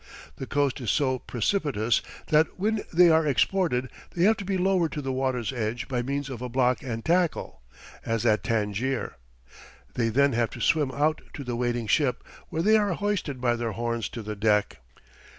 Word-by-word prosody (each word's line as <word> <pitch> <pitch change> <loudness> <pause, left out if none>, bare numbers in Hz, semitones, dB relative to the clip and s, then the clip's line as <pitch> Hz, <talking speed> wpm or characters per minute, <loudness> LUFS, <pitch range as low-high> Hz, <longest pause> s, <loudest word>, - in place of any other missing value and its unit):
The 130 - -6
coast 140 -2 0
is 120 - -3
so 130 0 +1
precipitous 120 - 0 0.3
that 155 +1 +3
when 210 +3 0
they 175 0 +6
are 160 -1 +3
exported 140 -4 +1 0.2
they 175 - +1
have 220 +4 +5
to 205 - -5
be 195 0 -1
lowered 180 -3 +2
to 150 - -3
the 135 - -2
water's 130 -2 -1
edge 115 -1 -3
by 125 -3 -1
means 140 +2 -3
of 130 -4 -7
a 125 - -4
block 125 0 +1
and 115 -3 -5
tackle, 175 - 0 0.4
as 115 0 -1
at 110 -2 +3
Tangier. 115 - -1 0.8
They 115 -2 0
then 140 +4 +3
have 115 0 +1
to 120 - -9
swim 150 +3 +2
out 150 +4 0
to 140 - -6
the 125 -2 -3
waiting 120 -1 -1
ship, 130 +3 +1 0.3
where 160 - -2
they 220 +3 +5
are 205 -3 +1
hoisted 195 -10 -2
by 120 -1 +1
their 115 -1 -3
horns 115 0 -2
to 115 - -7
the 105 0 -5
deck. 105 0 +1
130 Hz, 190 wpm, -26 LUFS, 120-160 Hz, 0.8 s, they